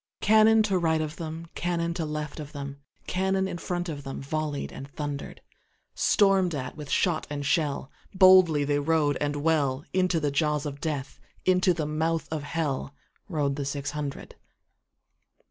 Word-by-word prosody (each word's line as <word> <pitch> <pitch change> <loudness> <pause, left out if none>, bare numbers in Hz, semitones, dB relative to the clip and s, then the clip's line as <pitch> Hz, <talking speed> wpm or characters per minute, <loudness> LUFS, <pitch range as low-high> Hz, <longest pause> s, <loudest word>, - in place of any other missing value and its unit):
Cannon 220 +1 +5
to 195 -3 +1
right 160 -2 +2
of 155 +1 -4
them, 165 0 -6
Cannon 170 -1 -1
to 170 -2 -3
left 150 0 -4
of 150 -1 -8
them, 140 -1 -6 0.3
Cannon 190 +1 0
in 175 - -5
front 175 0 -3
of 150 -4 -5
themVolley'd 145 +2 -4
and 135 - -8
thunder'd; 145 -1 -5 0.5
Storm'd 195 -4 +3
at 130 -2 -5
with 150 -2 -8
shot 175 -4 +1
and 145 -1 -4
shell, 145 -2 0 0.2
Boldly 185 -5 +6
they 145 0 +1
rode 145 -1 +2
and 145 0 -1
well, 145 -2 +1
Into 185 -2 +2
the 145 -2 0
jaws 150 0 +1
of 145 -1 -5
Death, 150 -4 -3 0.3
Into 185 0 +4
the 160 -3 -1
mouth 160 +2 -1
of 155 -2 -2
HellRode 145 -1 -3
the 145 - -2
six 140 +1 -3
hundred. 150 -2 -5
155 Hz, 160 wpm, -27 LUFS, 145-175 Hz, 0.5 s, Boldly